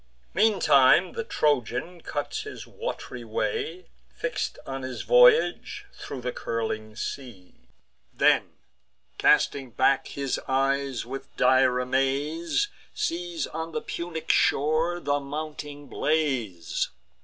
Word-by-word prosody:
Meantime 180 -6 +5
the 465 - -3
Trojan 150 - 0
cuts 145 -2 -3
his - - -8
wat'ry 125 -1 -6
way, 115 - -3 0.3
Fix'd - - -3
on 135 0 -5
his 130 -1 -5
voyage, - - +4
thro' 140 - -7
the 125 0 -3
curling 110 -2 -3
sea; 115 -7 -7 0.6
Then, - - +3 0.7
casting 135 -3 +3
back 130 +3 +2
his 140 -2 -2
eyes, 135 -1 0
with 135 +3 -8
dire 130 0 +4
amaze, 140 - 0 0.3
Sees 170 -2 -2
on 160 +1 -6
the 230 - -2
Punic 170 -6 -3
shore 155 +4 +2
the 145 -3 0
mounting 145 0 -6
blaze. 130 - -1
140 Hz, 110 wpm, -26 LUFS, 130-160 Hz, 0.7 s, Meantime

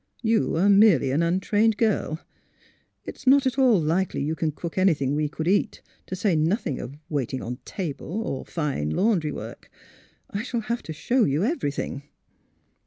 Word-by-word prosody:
You 225 0 +2
are 185 +4 +3
merely 200 - +5
an 145 +5 +1
untrained 205 +5 +2
girl. 210 -8 0 0.9
It - - -7
is 275 - -16
not 275 +1 +6
at 260 +1 0
all 250 -7 +5
likely 165 +1 0
you 155 +2 -1
can 160 -1 -1
cook 165 +2 -7
anything 155 -8 +2
we 150 0 0
could 160 +1 -4
eat, 200 +3 +1 0.2
to 185 - -4
say 185 -1 +1
nothing 160 - 0
of 135 +4 -7
waiting 130 -3 -2
on 125 +2 -5
table, 165 -5 -5
or 135 - -4
fine 145 - -2
laundry 175 - +1
work. - - -8 0.6
I 200 - -2
shall 235 0 -3
have 235 +2 -3
to - - -8
show 240 - +1
you 145 +5 +1
everything. 210 - -2
175 Hz, 175 wpm, -25 LUFS, 150-220 Hz, 0.9 s, not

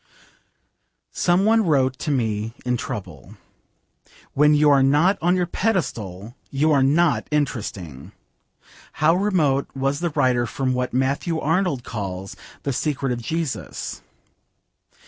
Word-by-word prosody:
Some 180 +2 +2
one 225 +1 +4
wrote 135 -6 +1
to - - -3
me 110 -4 -1
in 125 0 +1
trouble, 90 - -7 1.0
'When 150 +2 +4
you 150 0 +5
are 140 -1 +5
not 150 +9 +3
on 175 +2 +3
your 180 -1 +1
pedestal 120 - -2
you 150 +3 +1
are 140 -2 +4
not 150 +4 +2
interesting.' 105 - -3 0.8
How 155 +2 +3
remote 170 -8 +1
was 135 +1 -1
the 170 0 -1
writer 125 -5 +1
from 130 0 -1
what 125 0 -2
Matthew 135 +6 0
Arnold 160 -5 0
calls 95 -5 -5 0.3
'the 140 - -1
Secret 135 -1 -1
of 120 -1 -3
Jesus.' 160 +3 -4
140 Hz, 125 wpm, -22 LUFS, 120-160 Hz, 1.0 s, you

